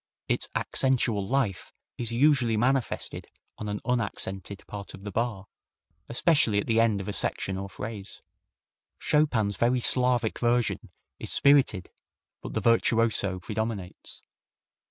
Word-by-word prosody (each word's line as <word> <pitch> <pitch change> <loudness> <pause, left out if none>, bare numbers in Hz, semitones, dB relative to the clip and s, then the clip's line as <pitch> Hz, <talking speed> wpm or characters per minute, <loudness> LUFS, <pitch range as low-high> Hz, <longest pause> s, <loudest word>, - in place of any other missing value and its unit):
Its - - 0
accentual 115 -6 +1
life 130 -9 -1 0.2
is 120 -1 -4
usually 125 -3 +3
manifested 130 +2 -1 0.3
on 105 - -4
an 105 0 -3
unaccented 100 -5 -3
part 100 -1 -8
of 95 - -15
the 100 - -6
bar, 110 -2 -2 0.6
especially 120 -4 +2
at 100 - 0
the 115 0 +2
end 115 -3 +2
of 100 - -6
a 105 - -3
section 95 0 -1
or 100 +1 -5
phrase. 105 +1 -8 0.7
Chopin's 120 -10 +1
very 125 +2 +2
Slavic 125 -2 +3
version 120 -1 0 0.3
is - - -4
spirited, 135 -10 +3 0.5
but - - -8
the - - 0
virtuoso 115 -4 +2
predominates. 105 -1 -5
115 Hz, 130 wpm, -27 LUFS, 100-125 Hz, 0.7 s, usually